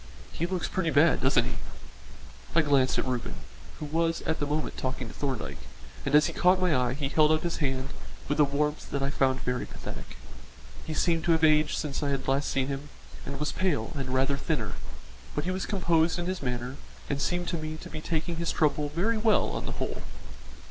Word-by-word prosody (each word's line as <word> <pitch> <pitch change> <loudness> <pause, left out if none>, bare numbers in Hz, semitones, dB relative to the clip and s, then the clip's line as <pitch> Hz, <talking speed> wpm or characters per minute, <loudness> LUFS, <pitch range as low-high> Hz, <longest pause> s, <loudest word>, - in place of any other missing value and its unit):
He 170 - -2
looks 185 -1 -1
pretty 170 -3 0
bad, 160 +2 +4
doesn't - - +4
he?" - - -4 1.0
I 165 - +7
glanced 140 -3 +3
at - - +1
Reuben, 125 -2 -2 0.4
who 150 - -4
was 165 +2 0
at 160 - -1
the 145 - -1
moment 150 +1 -1
talking 130 -1 -3
to - - -9
Thorndyke, 135 -5 -3 0.5
and 140 - +3
as 150 - +7
he - - -2
caught 180 +1 +4
my 180 -4 +3
eye 125 0 +1
he 140 -1 -1
held 150 +2 +4
out 155 0 +2
his 170 -1 -1
hand 135 -2 -1 0.4
with 145 +1 0
a - - +8
warmth 150 +2 0
that 140 -1 -1
I 135 - 0
found 130 -2 +2
very 125 0 -2
pathetic. - - -8 0.7
He 155 - -3
seemed 165 -1 +2
to 170 - +5
have 160 0 +1
aged 155 -1 +4
since 145 -1 -2
I 145 - 0
had 135 -2 -2
last 135 +2 +1
seen 135 -1 +1
him, 140 +2 -4 0.4
and 140 0 -5
was 150 - 0
pale 160 -12 0
and 135 -3 -3
rather 135 +2 +2
thinner, 140 -8 -1 0.6
but 150 - 0
he 180 - -1
was 185 0 -2
composed 170 -4 +2
in 175 - -2
his 185 0 -2
manner 125 0 -3 0.3
and 140 -1 -1
seemed 175 +2 0
to 170 - -1
me 155 0 -4
to - - -10
be 155 - -5
taking 165 +1 -2
his 170 0 0
trouble 150 -1 +1
very 205 +9 +1
well 215 -1 +3
on - - -4
the - - -3
whole. - - -3
150 Hz, 215 wpm, -28 LUFS, 135-165 Hz, 1.0 s, a